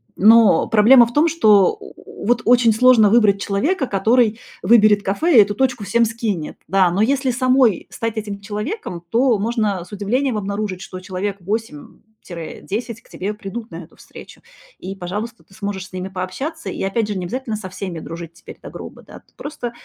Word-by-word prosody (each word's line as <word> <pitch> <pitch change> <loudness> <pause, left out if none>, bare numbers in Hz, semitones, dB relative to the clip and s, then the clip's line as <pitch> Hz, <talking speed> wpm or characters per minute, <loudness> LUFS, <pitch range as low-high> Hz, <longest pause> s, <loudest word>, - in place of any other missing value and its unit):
но 215 -3 +5
проблема 235 +3 +6
в 235 - -9
том, 300 +5 +3
что, 220 - +3
о, 415 - -12
вот, 240 +2 +2
очень 240 -2 +4
сложно 225 -3 +5
выбрать 210 -4 +4
человека, 265 - -1
который 225 +2 +1 0.2
выберет 210 0 +4
кафе 255 - +1
и - - +10
эту 205 0 +1
точку 250 0 -1
всем 230 +4 +2
скинет. 215 -8 -4
Да, 190 0 +3
но 190 +5 +1
если 265 +2 0
самой 255 -3 +2
стать 225 -1 -4
этим 205 -2 -5
человеком, 210 - -6
то 235 +4 +2
можно 210 -3 -1
с - - -20
удивлением 220 +4 -1
обнаружить, 200 -2 -4
что 185 -2 -8
человек 190 +2 -4
8 225 +8 -5 0.2
тире 170 -3 -8
10 230 +2 -5
к - - -26
тебе 200 +3 -5
придут 220 +2 -8
на 165 - -8
эту - - -24
встречу, - - -14 0.4
и, 195 +1 -7
пожалуйста, 210 +6 -6
ты - - -23
сможешь 195 -1 -5
с - - -24
ними 185 +1 -5
пообщаться. 265 - -6
И - - -4
опять 205 +3 -1
же 205 -2 -4
не 185 - -4
обязательно 240 +4 -4
со 205 -3 -7
всеми 185 -2 -6
дружить 165 +1 -9
теперь - - -13
до - - -9
гроба, - - -10
да, - - -14
просто 250 -5 -6
215 Hz, 185 wpm, -19 LUFS, 195-240 Hz, 0.4 s, и